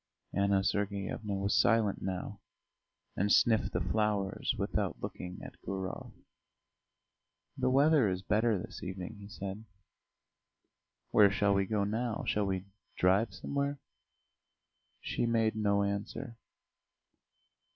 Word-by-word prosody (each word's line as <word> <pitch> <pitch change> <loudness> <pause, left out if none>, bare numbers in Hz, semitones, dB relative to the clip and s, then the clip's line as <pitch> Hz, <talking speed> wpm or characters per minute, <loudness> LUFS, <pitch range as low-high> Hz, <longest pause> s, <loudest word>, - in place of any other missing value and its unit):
Anna 100 -1 +2
Sergeyevna 100 +1 -1
was 100 +1 0
silent 115 -4 +2
now, 95 +2 -4 0.8
and 100 +2 +1
sniffed 110 -2 +4
the - - 0
flowers 105 -3 0
without - - -1
looking 90 0 -6
at - - -11
Gurov. 95 -1 -5 1.4
"The - - +1
weather 140 -3 +5
is 90 0 -3
better 110 +3 +2
this 90 - -7
evening," 95 +3 -6
he 100 - -10
said. 100 0 -6 1.5
"Where 100 -1 +7
shall 100 0 +2
we 100 -1 +1
go 105 -1 +1
now? 110 +2 -2
Shall 105 -1 +1
we 95 -1 -2 0.3
drive 95 +5 +3
somewhere?" 140 0 -2 1.2
She 120 - -1
made 115 -2 +2
no 100 -2 +2
answer. 100 +5 -3
100 Hz, 115 wpm, -32 LUFS, 95-110 Hz, 1.5 s, Where